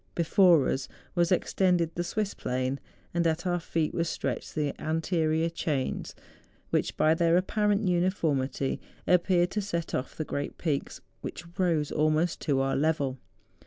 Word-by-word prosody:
Before 170 -3 +5
us 135 -1 -1 0.3
was 175 -1 +2
ex¬ 180 - +1
tended 175 -3 +2
the 175 - -2
Swiss 205 +3 -2
plain, 130 +2 -2 0.3
and 170 -1 +2
at 165 +3 -1
our 175 -1 +1
feet 165 -2 -1
were 170 - +1
stretched 165 - -3
the 150 -3 0
anterior 160 0 +1
chains 150 -5 -2 0.6
which, - - 0
by 155 - +4
their 170 0 +3
apparent 210 +2 +1
uni¬ 180 0 +3
formity, 140 -6 -1 0.3
appeared 180 0 +3
to 210 - -1
set 170 -5 -3
off 130 - -3
the 155 - -3
great 145 0 -4
peaks 150 -5 -2 0.2
which - - -6 0.2
rose 165 -5 +1
almost 155 +2 +1
to 140 -3 +1
our 135 0 +1
level. 140 -3 0
165 Hz, 160 wpm, -28 LUFS, 150-175 Hz, 0.6 s, Before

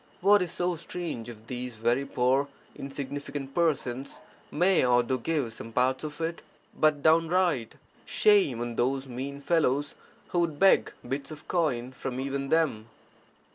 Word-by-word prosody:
What 200 +2 +6
is 180 -2 -1
so 175 0 0
strange 165 -8 -5
if 110 -2 -11
these 125 -1 -5
very 120 +5 +1
poor 130 +3 +2 0.3
insignificant 140 0 -6
persons 135 -7 -1 0.3
may 180 +4 +3
or 125 -1 +4
do 130 +1 -1
give 135 -4 -1
(some 115 0 -8
parts 130 +4 +1
of 150 0 -6
it)? 165 +1 -3 0.3
But 150 -2 +2
downright 165 -5 +2 0.3
shame 190 - +3
on 120 -1 -4
those 135 +2 0
mean 135 +3 -5
fellows 145 -3 +1 0.4
who 175 - 0
would 165 -4 0
beg 195 +5 +4 0.2
bits 135 +2 -3
of 155 -1 -10
coin 130 -8 0
from 130 -1 -5
even 135 0 -3
them 145 -10 +1
140 Hz, 150 wpm, -28 LUFS, 125-165 Hz, 0.4 s, What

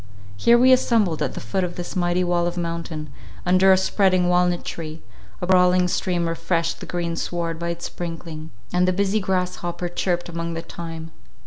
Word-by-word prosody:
Here 235 - +5
we 255 +2 +6
assembled 215 -10 +2
at - - -1
the - - -4
foot 190 -1 -2
of 175 -1 -3
this 175 - -6
mighty 175 0 +1
wall 175 -1 +1
of 175 - -4
mountain, 165 -3 -4 0.3
under 185 +2 +5
a 190 - +6
spreading 185 -1 +2
walnut 180 0 +2
tree; 160 -1 -6 0.4
a - - +2
brawling 180 0 +4
stream 175 -1 0
refreshed 165 0 -1
the - - -8
green 170 -1 -2
sward 165 -1 -3
by 170 0 -2
its 170 0 -4
sprinkling; 165 -2 -6 0.2
and 180 0 +3
the 185 - +3
busy 200 +3 +1
grasshopper 180 -2 -2
chirped 175 0 -1
among 170 -1 -4
the 165 - -4
thyme. 165 -1 -7
175 Hz, 185 wpm, -23 LUFS, 165-185 Hz, 0.4 s, we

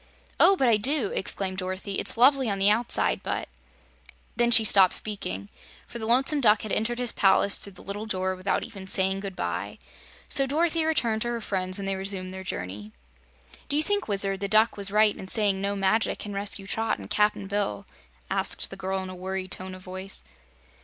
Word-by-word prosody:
"Oh, 390 - +6
but 265 -8 +1
I 225 -2 +5
do!" 255 0 0
exclaimed 190 0 -2
Dorothy. 185 +1 -4
"It's - - +2
lovely 265 0 +4
on 200 - 0
the 195 +1 +4
outside, 230 +3 +2
but - - -3 0.5
" - - -27
Then 240 0 +2
she 230 -1 +7
stopped 195 -3 +5
speaking, 100 - +2 0.4
for 235 - -9
the 220 - -5
Lonesome 270 +5 +3
Duck 215 -3 +4
had 215 - -5
entered 235 +2 -1
his 245 -1 +1
palace 195 0 +3
through 200 - -5
the 180 - -14
little 205 +3 -5
door 185 -2 -1
without 185 +2 -1
even 195 -3 -8
saying 190 0 0
good 195 -1 -7
bye. - - -4 0.5
So 275 -1 +1
Dorothy 320 +3 +1
returned 235 -9 +1
to 240 - -1
her 240 0 -2
friends 185 -3 -3
and 195 -1 -4
they 195 - -1
resumed 190 -1 -4
their 190 0 -7
journey. 105 - -6 0.8
"Do 285 - +2
you 305 - +2
think, 410 +3 0
Wizard, 195 -2 +1
the 200 - -2
Duck 215 +3 +3
was 200 -1 -1
right 210 +1 +3
in 190 - -9
saying 200 -2 +1
no 200 0 -1
magic 200 +3 +1
can 205 - -7
rescue 200 0 -3
Trot 225 +3 -2
and 100 -2 -10
Cap'n 210 - +1
Bill?" 200 - -3 0.4
asked - - -1
the - - -6
girl 190 0 -3
in 185 - -7
a - - -8
worried 185 0 -5
tone 185 0 -3
of 185 - -13
voice. 190 +1 -5
200 Hz, 205 wpm, -26 LUFS, 190-225 Hz, 0.8 s, she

